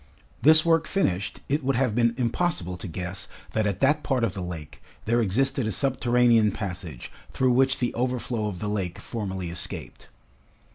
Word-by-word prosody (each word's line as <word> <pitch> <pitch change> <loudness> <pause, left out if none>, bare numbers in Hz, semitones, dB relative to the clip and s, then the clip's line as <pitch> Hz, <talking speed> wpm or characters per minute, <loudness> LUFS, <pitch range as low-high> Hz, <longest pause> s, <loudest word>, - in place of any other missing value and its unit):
This 155 +2 +6
work 165 -1 +3
finished, 100 - -1
it 145 +2 0
would 135 +1 +1
have 125 -3 +1
been 115 0 +2
impossible 120 - 0
to 95 - -7
guess 90 +2 -5 0.2
that 110 -1 +1
at 100 -2 -2
that 145 +3 +3
part 130 -5 0
of 110 -5 +1
the 100 - -5
lake, 85 -4 -7 0.2
there 120 +2 +2
existed 130 +4 +1
a - - 0
subterranean 120 -4 +3
passage 90 - -6 0.2
through 130 -1 +2
which 130 +2 +3
the 125 - -1
overflow 120 -2 -1
of 100 -3 -4
the 105 - -4
lake 95 -4 -2
formerly 95 -6 -4
escaped. 90 - -6
115 Hz, 175 wpm, -26 LUFS, 95-130 Hz, 0.2 s, This